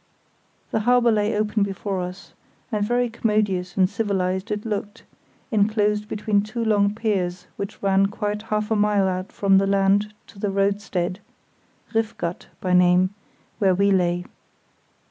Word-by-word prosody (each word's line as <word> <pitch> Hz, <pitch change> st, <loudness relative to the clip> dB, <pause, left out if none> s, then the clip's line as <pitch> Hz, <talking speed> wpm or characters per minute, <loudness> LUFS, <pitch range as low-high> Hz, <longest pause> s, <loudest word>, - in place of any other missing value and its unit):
The -, -, +1 dB
harbour 240 Hz, +1 st, +4 dB
lay 210 Hz, 0 st, +1 dB
open 210 Hz, 0 st, 0 dB
before 195 Hz, -1 st, -2 dB
us, 180 Hz, +2 st, -8 dB, 0.4 s
and 210 Hz, -2 st, 0 dB
very 245 Hz, +3 st, +1 dB
commodious 210 Hz, -6 st, -1 dB
and 185 Hz, -1 st, +5 dB
civilised 190 Hz, -1 st, -1 dB
it 210 Hz, 0 st, -3 dB
looked, 210 Hz, 0 st, -4 dB, 0.5 s
enclosed 210 Hz, -1 st, +1 dB
between 210 Hz, -1 st, 0 dB
two 215 Hz, +3 st, -4 dB
long 205 Hz, -1 st, +2 dB
piers 185 Hz, -5 st, -1 dB
which 200 Hz, 0 st, -7 dB
ran 195 Hz, 0 st, +3 dB
quite 210 Hz, 0 st, -3 dB
half 215 Hz, -1 st, -2 dB
a -, -, +3 dB
mile 205 Hz, -2 st, +2 dB
out 185 Hz, 0 st, -3 dB
from 195 Hz, -1 st, +3 dB
the 195 Hz, -, +1 dB
land 200 Hz, +1 st, +2 dB
to 200 Hz, -, -16 dB
the 205 Hz, -, -1 dB
roadstead 195 Hz, -2 st, -1 dB, 0.7 s
(Riff 225 Hz, -1 st, 0 dB
Gat 170 Hz, +1 st, -4 dB
by 185 Hz, -1 st, -1 dB
name) 180 Hz, +1 st, +4 dB, 0.5 s
where 190 Hz, -4 st, +3 dB
we 200 Hz, +2 st, +3 dB
lay. 175 Hz, -2 st, +1 dB
200 Hz, 150 wpm, -23 LUFS, 190-215 Hz, 0.7 s, and